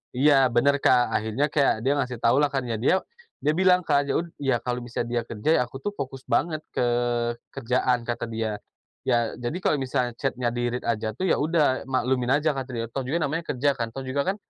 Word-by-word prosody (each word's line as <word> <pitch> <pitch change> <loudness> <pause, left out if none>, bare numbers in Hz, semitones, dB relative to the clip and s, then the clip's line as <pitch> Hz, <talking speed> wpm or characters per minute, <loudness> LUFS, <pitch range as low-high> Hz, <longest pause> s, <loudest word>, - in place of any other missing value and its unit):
Iya 145 +4 +5 0.2
benar, 140 +4 +4
Kak. 125 -2 +3
Akhirnya 110 +6 0
kayak 140 -2 +3
dia 135 - +2
ngasih 125 -2 -2
tau 115 +3 +4
lah 145 - +4
kan, 135 -2 -2
ya 115 -3 -3
dia 160 +11 +2 0.4
dia 150 - +3
bilang 180 +1 +4
kan 145 -3 +3
ya - - 0
ud 170 0 -3
ya 135 -3 +1
kalau 125 0 -2
misalnya 120 0 -3
dia 120 0 -1
kerja, 110 +5 -3
"Ya - - +3
aku 120 - -16
tuh 205 - -1
fokus 135 -7 -6
banget 155 -2 +1
ke - - -2 0.7
kerjaan," 125 -1 +1
kata 120 - -2
dia, 110 -1 -2 0.5
"ya, 120 -3 +1
jadi 120 +7 -4
kalau 180 - +2
misalnya 125 -3 -1
chat-nya 125 -1 -1
di-read 120 0 -2
aja 110 -1 0
tuh 185 +11 -3
ya - - +4
udah 150 -3 +1
maklumin 130 -1 0
aja," 150 +1 +2
kata 135 -1 -4
dia, 115 -2 -3
"toh 135 +4 -4
juga 135 +6 -1
namanya 165 +4 -2
kerja 140 +2 +1
kan. 115 -3 -3
Toh 135 - -6
juga 135 +2 0
kan - - -6
130 Hz, 220 wpm, -25 LUFS, 120-145 Hz, 0.7 s, Iya